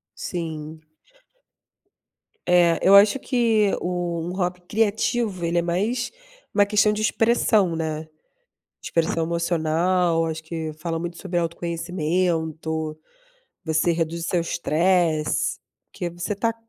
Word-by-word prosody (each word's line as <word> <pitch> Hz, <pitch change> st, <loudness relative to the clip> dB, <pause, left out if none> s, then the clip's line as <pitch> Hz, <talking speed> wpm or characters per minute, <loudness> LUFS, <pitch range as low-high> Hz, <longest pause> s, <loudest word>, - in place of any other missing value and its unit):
Sim. 160 Hz, -2 st, -5 dB, 1.7 s
É, 175 Hz, -2 st, +4 dB
eu 195 Hz, +1 st, +6 dB
acho 210 Hz, +6 st, +6 dB
que 225 Hz, -6 st, +2 dB
o 175 Hz, -2 st, -2 dB
um -, -, -4 dB
hobby 180 Hz, -1 st, -2 dB
criativo, 210 Hz, -1 st, 0 dB
ele 170 Hz, +1 st, +1 dB
é -, -, +2 dB
mais 210 Hz, +9 st, -1 dB, 0.4 s
uma 205 Hz, -1 st, +4 dB
questão 210 Hz, 0 st, +3 dB
de 210 Hz, -, -3 dB
expressão, 215 Hz, -5 st, +2 dB
né. 160 Hz, -1 st, -3 dB, 0.7 s
Expressão 165 Hz, 0 st, 0 dB
emocional. 170 Hz, +1 st, +1 dB
Acho 160 Hz, 0 st, -4 dB
que 160 Hz, -1 st, -5 dB
fala 165 Hz, +1 st, -4 dB
muito 170 Hz, 0 st, -5 dB
sobre 180 Hz, -2 st, -3 dB
autoconhecimento. 165 Hz, -2 st, -2 dB, 0.7 s
Você 160 Hz, +1 st, +1 dB
reduz 165 Hz, 0 st, -2 dB
o -, -, -3 dB
seu 175 Hz, -, +1 dB
estresse, 165 Hz, -2 st, +1 dB, 0.3 s
porque 175 Hz, -3 st, -4 dB
você 175 Hz, +4 st, -4 dB
tá 225 Hz, +3 st, -1 dB
170 Hz, 120 wpm, -23 LUFS, 160-190 Hz, 1.7 s, eu